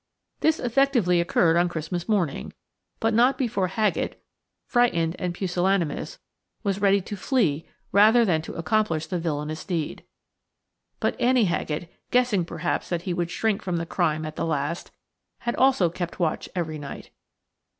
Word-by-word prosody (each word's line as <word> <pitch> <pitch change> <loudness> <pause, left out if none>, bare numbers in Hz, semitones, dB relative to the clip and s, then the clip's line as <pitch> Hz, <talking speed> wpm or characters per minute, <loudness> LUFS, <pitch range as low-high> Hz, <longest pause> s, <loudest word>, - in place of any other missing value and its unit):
This 315 0 +2
effectually 240 -8 +2
occurred 170 -1 +3
on 175 0 +3
Christmas 170 +3 -4
morning, 180 - 0 0.5
but 225 0 +1
not 245 +4 +4
before 230 -7 0
Haggett, 210 +3 -1 0.5
frightened 175 -10 +2
and 180 - -1
pusillanimous, 180 -2 -1 0.5
was 200 -2 -1
ready 200 0 +4
to 205 - -6
flee 185 - 0 0.2
rather 220 +4 +6
than 165 -6 +2
to - - -8
accomplish 165 -2 0
the 175 +2 -3
villainous 155 -1 -3
deed. 170 -5 -3 1.0
But - - -1
Annie 245 -2 +4
Haggett, 170 -1 -2 0.2
guessing 245 -8 +2
perhaps 170 0 -2
that 175 -1 -2
he 180 - -2
would 175 -1 -1
shrink 215 +2 0
from 180 -2 -2
the 165 - -2
crime 160 -3 0
at 155 0 -7
the - - -1
last, 150 +2 -2 0.5
had 240 0 -1
also 250 -10 +4
kept 175 +1 -5
watch 165 -3 -1
every 160 -3 -2
night. 140 -1 -8
180 Hz, 150 wpm, -25 LUFS, 165-215 Hz, 1.0 s, rather